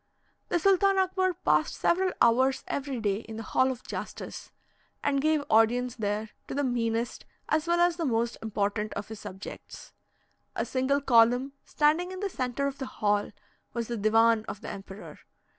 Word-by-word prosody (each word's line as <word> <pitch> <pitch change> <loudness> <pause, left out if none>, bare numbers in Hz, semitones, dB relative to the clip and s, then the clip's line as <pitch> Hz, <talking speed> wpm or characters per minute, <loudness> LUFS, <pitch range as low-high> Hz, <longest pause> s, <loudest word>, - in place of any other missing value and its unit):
The - - +2
Sultan 390 +2 +3
Akbar 375 -1 +1
passed - - +2
several 370 +1 +2
hours 260 +3 +3
every 275 -3 -3
day 205 -3 0
in 220 0 -8
the 225 - -5
Hall 260 +4 +2
of 255 -2 -5
Justice, - - -7 0.5
and 275 -1 +1
gave 310 0 +2
audience 240 +3 +3
there 210 0 -2 0.2
to - - -5
the 285 - 0
meanest, 235 -2 -1 0.3
as 310 +2 +1
well 345 0 +2
as 345 -1 +3
the 335 - -1
most 235 -2 0
important 210 0 -2
of 205 - -5
his 220 -2 -7
subjects. 195 -1 -9 0.6
A - - -1
single 265 +2 0
column, 245 +1 +4
standing 315 +5 +2
in 375 - -6
the 400 -1 -2
centre 255 0 -2
of 280 -1 -3
the 265 - -4
hall, 205 -4 0 0.4
was 235 -1 -3
the 240 - -2
divan 225 +1 +3
of - - -6
the - - -6
emperor. 195 +1 -9
250 Hz, 175 wpm, -28 LUFS, 225-300 Hz, 0.6 s, column